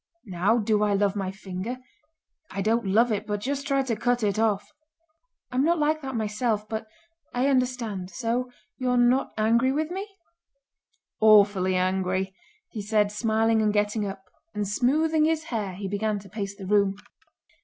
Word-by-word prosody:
Now 195 +4 +1
do 215 -2 +1
I 205 -1 +2
love 200 0 +1
my 195 -2 -2
finger? 195 +4 -5 0.7
I 195 +1 -3
don't 225 0 +1
love 225 +5 +3
it, 210 0 -2
but 205 -1 -1
just 280 +5 -3
try 275 -1 +2
to 245 -4 -1
cut 245 +1 0
it 210 0 +1
off!" 210 0 0 0.8
"I'm 255 +2 +1
not 340 +3 +3
like 310 +1 +1
that 265 -2 -5
myself, 215 0 -1
but 220 0 -4 0.5
I 250 +2 +1
understand. 250 -8 0
So 235 +7 -2 0.3
you're 250 -1 +1
not 245 +2 +3
angry 230 +4 +3
with 310 +4 -1
me?" 385 +3 -4 1.1
"Awfully 205 -3 +5
angry!" 185 +1 0 0.4
he 215 - -5
said, 210 0 +1
smiling 220 +1 +2
and 210 -1 +2
getting 210 +1 0
up. 195 0 -7 0.3
And 210 -1 -1
smoothing 305 +8 +2
his 320 0 +1
hair 200 -5 -2
he 195 +1 -5
began 205 +2 -1
to 200 -1 -11
pace 200 0 -5
the 195 - -9
room. 200 0 +2
215 Hz, 165 wpm, -26 LUFS, 200-250 Hz, 1.1 s, Awfully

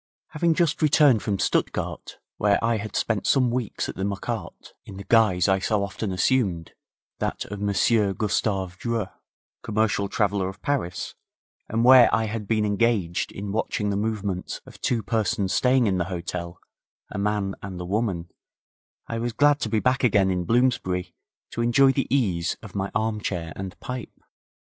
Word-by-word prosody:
Having 165 +1 +1
just 170 -2 +1
returned 145 -6 +5
from 100 -2 -1
Stuttgart, - - -2 0.2
where 100 -1 +3
I 115 0 +2
had 105 -1 -6
spent 110 -4 0
some 130 -3 +3
weeks 120 -3 -2
at - - -6
the 95 - -4
Marquardt 100 -1 -5
in 95 - -10
the 100 - -7
guise 105 -5 +3
I 95 -1 +3
so 100 +1 0
often 100 +1 -4
assumed, 90 -3 0 0.5
that - - -2
of 105 -1 -5
Monsieur 100 +1 +2
Gustav 95 -2 -1
Dreux, 115 -5 -2 0.5
commercial 105 -2 0
traveller, 100 -5 0
of 95 - -10
Paris, 130 -12 -2 0.6
and 115 +2 +1
where 130 -1 +8
I 115 - +2
had 110 -1 -4
been 110 -1 +1
engaged 105 -4 0
in 100 0 -6
watching 105 -1 -1
the - - -1
movements 100 -3 -2
of - - -15
two 115 -3 0
persons 100 -3 0
staying 125 -1 +3
in 95 -3 +1
the 85 - 0
hotel, 85 -1 -5 0.5
a 105 - -4
man 100 -1 0
and 95 -2 -7
a 90 - -5
woman, 95 -3 -2 0.8
I 115 - -4
was 120 0 -2
glad 145 +3 +4
to 110 - -2
be 110 0 +1
back 130 +4 +1
again 100 -5 +3
in 90 -1 -1
Bloomsbury 115 -7 +1 0.4
to 115 - -3
enjoy 135 +3 +5
the 135 0 -1
ease 95 -11 0
of 105 - -10
my 100 -1 -2
armchair 105 -7 -2
and 95 -1 -7
pipe. 125 -2 -7
105 Hz, 170 wpm, -25 LUFS, 95-115 Hz, 0.8 s, where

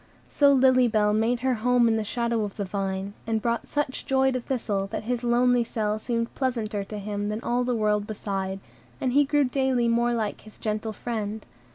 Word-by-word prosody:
So 285 -1 +5
Lily 260 -2 +5
Bell 210 -2 +2
made 225 +3 +1
her 260 0 +2
home 245 +1 +3
in 225 - +3
the 220 - 0
shadow 235 +1 -1
of 205 -2 -6
the 200 - -2
vine, 195 0 -3
and 225 -1 +1
brought 235 +2 -1
such 290 -2 -3
joy 265 0 +3
to 255 - -1
Thistle, 210 -6 -2
that - - -5
his 245 +1 -2
lonely 245 0 +3
cell 215 -2 -2
seemed 230 0 -2
pleasanter 225 -6 -2
to 210 - -7
him 205 0 -3
than 210 +1 -2
all 245 +1 +1
the 245 0 0
world 210 -1 +1
beside; 195 -2 -3 0.4
and 255 -2 0
he 290 +1 +5
grew 290 +1 +2
daily 260 -2 +1
more 235 +1 +2
like 220 -3 -2
his 215 - -15
gentle 215 0 -2
friend. 215 -1 -4
230 Hz, 205 wpm, -26 LUFS, 210-250 Hz, 0.4 s, So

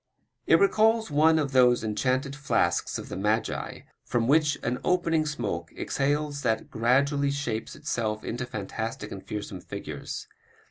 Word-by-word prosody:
It - - +7
recalls 225 - +3
one 160 +2 +5
of 145 -3 0
those 125 -3 +5
enchanted 130 +6 0
flasks 115 - 0
of - - -7
the - - -6
magii 105 +3 -1 0.2
from 115 -1 0
which 150 +1 +3
on 125 +2 -1
opening 165 -3 +2
smoke 120 -8 -3
exhales 145 +1 -1
that 110 -4 -1
gradually 140 +5 +2
shapes 140 -6 -3
itself 110 -2 -2
into 120 +1 -4
fantastic 110 +1 -5
and 95 - -7
fearsome 100 -3 -6
figures. - - -6
130 Hz, 140 wpm, -27 LUFS, 110-150 Hz, 0.2 s, It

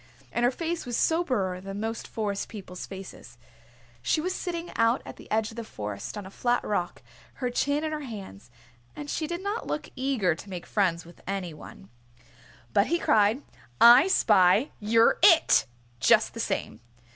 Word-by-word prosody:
And 240 - -1
her 245 - +5
face 330 +3 -4
was 240 -1 -2
soberer 240 - 0
than 195 +1 -6
most 225 +1 -4
Forest 205 -3 -3
People's 190 -4 -8
faces. 190 -10 -10 0.6
She 215 - +1
was 365 +4 -2
sitting 345 -2 -4
out 230 +3 +2
at - - -9
the - - -14
edge 220 0 0
of 225 - -14
the 230 - -4
Forest 105 - -6
on 205 - -6
a 190 - -10
flat 240 +3 0
rock, 175 -8 -3 0.3
her 250 -2 -3
chin 285 +4 0
in 310 - -2
her 310 - -3
hands, 195 - -9 0.5
and 290 -1 -6
she 315 - -2
did 345 +3 -5
not 410 +3 -3
look 300 - -4
eager 255 -10 +1
to 170 +5 -11
make 180 -2 -6
friends 180 -5 0
with 170 - -16
any 190 -4 -3
one. 100 -9 -13 0.8
But 200 - +3
he 340 - +1
cried, 220 -2 +2 0.4
"I 245 +8 +8
spy! 210 - +4
You're 225 +2 +3
It!" 335 -4 +6 0.3
just - - +4
the - - -8
same. 105 - -3
225 Hz, 180 wpm, -27 LUFS, 190-285 Hz, 0.8 s, I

